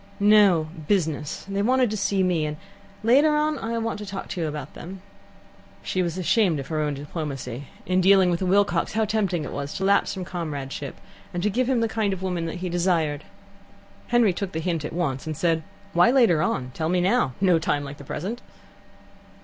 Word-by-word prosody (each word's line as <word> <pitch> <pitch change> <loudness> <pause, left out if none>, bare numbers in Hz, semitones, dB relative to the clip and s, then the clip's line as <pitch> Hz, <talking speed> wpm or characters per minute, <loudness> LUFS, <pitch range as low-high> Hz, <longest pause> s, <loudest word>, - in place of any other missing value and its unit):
"No; 200 -6 +5 0.2
business. 155 -7 -1
They 200 0 -1
wanted 250 +1 +2
to - - -1
see 195 -1 +1
me, 175 -4 +1
and 150 0 -5 0.5
later 285 +7 +5
on 300 -1 +1
I 230 +1 -3
want 225 -2 -2
to 210 - -6
talk 195 0 -6
to 185 -3 -4
you 160 - 0
about 150 -2 -6
them." 190 +3 -9 0.8
She 185 - -1
was 175 -1 -2
ashamed 185 -3 +2
of 135 - -7
her 155 -1 -1
own 150 -1 -1
diplomacy. 140 -3 -5 0.2
In 185 +1 +2
dealing 190 -1 +5
with 170 - -1
a 185 - 0
Wilcox, 190 -3 +2
how 220 0 +2
tempting 200 -6 0
it - - -6
was 140 0 -5
to 190 - -3
lapse 200 +1 +3
from 185 -1 -5
comradeship, 145 -6 -5 0.4
and 175 - -2
to 210 - +2
give 250 +4 0
him 250 -3 +2
the 230 - +2
kind 220 -3 0
of 190 0 -6
woman 180 -3 -2
that 165 - -5
he - - -1
desired! 170 -4 0 0.8
Henry 240 -5 +3
took 190 +1 -4
the 160 - -2
hint 165 -2 -1
at - - -4
once, 160 -5 -2
and 155 -2 -3
said: 165 0 +1 0.3
"Why 175 +4 +5
later 235 - +4
on? 130 -4 -1
Tell 160 +3 -2
me 180 +1 +2
now. 185 - +2
No 180 -4 +4
time 145 -2 0
like 140 0 -8
the - - -11
present." 210 - -5
180 Hz, 210 wpm, -24 LUFS, 155-205 Hz, 0.8 s, No